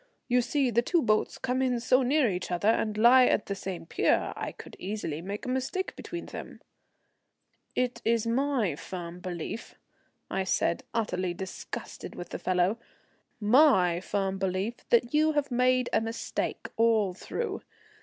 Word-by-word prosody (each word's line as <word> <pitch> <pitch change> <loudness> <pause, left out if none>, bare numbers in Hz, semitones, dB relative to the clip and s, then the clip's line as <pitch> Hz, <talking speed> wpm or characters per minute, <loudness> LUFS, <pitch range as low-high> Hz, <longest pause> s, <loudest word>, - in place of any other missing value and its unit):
You 250 0 +3
see 255 +1 +1
the 235 +1 +3
two 335 +5 +1
boats 215 -1 +1
come 255 0 -1
in 250 -2 +1
so 255 +2 +3
near 270 +1 +3
each 180 -3 -2
other 180 +4 +1
and 215 -1 +1
lie 250 +3 +7
at - - +2
the 200 - -3
same 190 -3 -6
pier. - - +1
I - - -4
could - - -12
easily 185 -6 -4
make 200 +7 -5
a - - -5
mistake 260 +9 -2
between 345 -1 -6
them." - - -8 1.2
"It 250 0 -1
is 230 0 +2
my 235 - +1
firm 175 +2 -7
belief," 180 +5 -6 0.5
I 190 - -1
said, 180 -2 0
utterly 185 -5 -1
disgusted 190 +1 -7
with 175 - -7
the - - -5
fellow, 185 +4 +1 0.6
"my 210 - +5
firm 195 0 -2
belief 190 +5 -1
that 240 +2 +3
you 310 +1 +4
have 290 -2 0
made 250 0 +3
a - - +4
mistake 225 +1 -3
all 220 -4 +3
through. 415 - -4
225 Hz, 160 wpm, -28 LUFS, 190-255 Hz, 1.2 s, lie